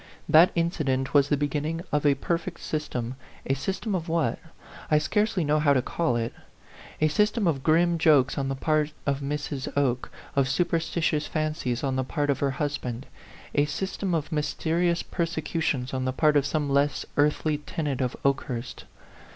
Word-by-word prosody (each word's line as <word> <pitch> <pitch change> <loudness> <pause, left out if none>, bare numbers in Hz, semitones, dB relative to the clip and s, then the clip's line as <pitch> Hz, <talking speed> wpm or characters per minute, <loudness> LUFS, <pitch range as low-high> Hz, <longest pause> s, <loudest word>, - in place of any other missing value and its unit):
That 165 +3 +7
incident 150 -6 0
was 140 -1 +5
the 145 - +2
beginning 150 +3 -1
of 150 0 +2
a 140 - +4
perfect 170 +5 -3
system 130 -5 -3 0.3
a 135 - +1
sys 165 +8 -2
tem 215 - -2
of 170 -2 -2
what? 165 0 0 0.5
I 150 - +5
scarcely 210 +4 +1
know 150 +1 +2
how 145 -2 +4
to 130 - +3
call 165 -5 0
it. 115 0 -2 0.7
A 155 - +4
system 210 +7 +1
of 150 -6 +1
grim 170 +3 +3
jokes 145 -5 +4
on 135 -1 -1
the 135 - -1
part 155 +1 0
of 140 -1 0
Mrs. 145 -1 -3
Oke, 130 -3 +1 0.3
of 135 -1 +2
superstitious 165 0 0
fancies 155 -6 -2
on 135 -2 0
the 130 - +1
part 145 +2 0
of 135 - -2
her 140 - +1
husband 135 -4 -3 0.5
a 145 - +3
system 190 +4 -2
of 155 +1 -3
mysterious 170 +3 0
persecu 165 -1 -2
tions 130 -5 -1
on 130 0 -1
the 130 - 0
part 150 +2 +3
of 140 -1 +3
some 150 0 -1
less 140 +1 +1
earthly 150 +1 +2
tenant 145 -2 -3
of 125 -2 -1
Okehurst. 135 -3 -2
150 Hz, 175 wpm, -26 LUFS, 135-165 Hz, 0.7 s, That